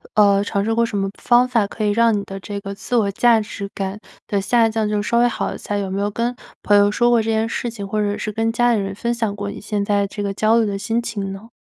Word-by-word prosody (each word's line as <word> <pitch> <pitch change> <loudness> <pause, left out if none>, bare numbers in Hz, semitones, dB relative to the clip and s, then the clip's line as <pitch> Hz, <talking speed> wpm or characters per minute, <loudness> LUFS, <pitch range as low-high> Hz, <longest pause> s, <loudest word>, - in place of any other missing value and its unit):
呃， 200 -1 +5
尝 200 0 -1
试 225 - +1
过 230 +1 +2
什 230 -3 -2
么 195 0 0
方 250 0 +4
法 230 -5 +1
可 215 +1 -4
以 205 - +2
让 230 +2 +4
你 200 - -3
的 195 0 -7
这 200 +1 -6
个 200 0 -6
自 220 +5 -4
我 210 -4 +2
价 235 +3 +4
值 210 -2 -6
感 195 +1 -4 0.3
的 200 -1 0
下 230 +3 +3
降 220 -1 -1
就 210 0 0
稍 235 +3 +1
微 240 - +5
好 240 - -2
一 - - -7
下？ 205 - -4
就 200 - -1
有 190 - -5
没 195 +1 -2
有 205 - 0
跟 235 +4 -2 0.3
朋 205 - +4
友 205 0 +5
说 240 +3 +2
过 235 -1 +4
这 225 - -3
件 220 0 +1
事 240 +1 -3
情， 210 -4 -7
或 215 +2 -1
者 205 0 -1
是 215 - -4
跟 225 +2 0
家 240 +1 +2
里 220 - +1
人 195 0 -4
分 235 +3 -1
享 225 -4 -2
过 205 0 -4
你 - - -9
现 205 -1 -2
在 200 -1 +1
这 205 +1 -5
个 200 -1 -2
焦 215 +3 +3
虑 230 - +3
的 200 -1 -3
心 225 +3 -1
情 205 -5 -4
呢？ 195 +4 -9
210 Hz, 325 characters per minute, -20 LUFS, 200-230 Hz, 0.3 s, 呃